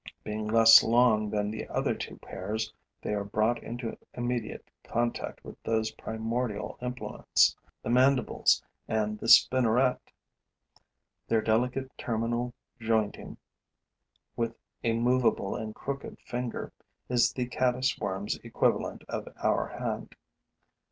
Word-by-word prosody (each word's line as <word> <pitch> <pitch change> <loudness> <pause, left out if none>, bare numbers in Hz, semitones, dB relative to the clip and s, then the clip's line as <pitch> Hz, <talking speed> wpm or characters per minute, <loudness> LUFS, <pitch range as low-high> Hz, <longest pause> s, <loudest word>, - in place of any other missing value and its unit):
Being 105 0 -4
less 115 +1 +9
long 115 -2 +3
than 105 0 -1
the 110 - -5
other - - 0
two - - -7
pairs, 110 +4 -4 0.3
they - - -2
are 100 -1 -1
brought 110 +4 0
into 120 -1 -5 0.2
immediate 120 -2 -3 0.2
contact 120 0 -2
with - - -11
those 110 -1 0
primordial 110 -1 -3
implements, 125 0 +1 0.3
the 115 - -2
mandibles 130 0 +3 0.2
and 105 -1 -1
the - - -5
spinneret. 125 +1 +5 1.3
Their 110 -1 +2
delicate 125 +4 0
terminal 120 +1 -1 0.2
jointing, 110 -2 -1 1.0
with 115 -1 -2 0.3
a 115 - +2
movable 120 -3 +2
and 110 0 -5
crooked 140 0 -5
finger, 120 -1 -4 0.3
is 120 -2 +3
the 125 - -2
caddis 130 +2 0
worm's 100 +1 -2
equivalent - - -1
of - - -4 0.2
our - - +2
hand. - - -5
115 Hz, 120 wpm, -29 LUFS, 110-125 Hz, 1.3 s, less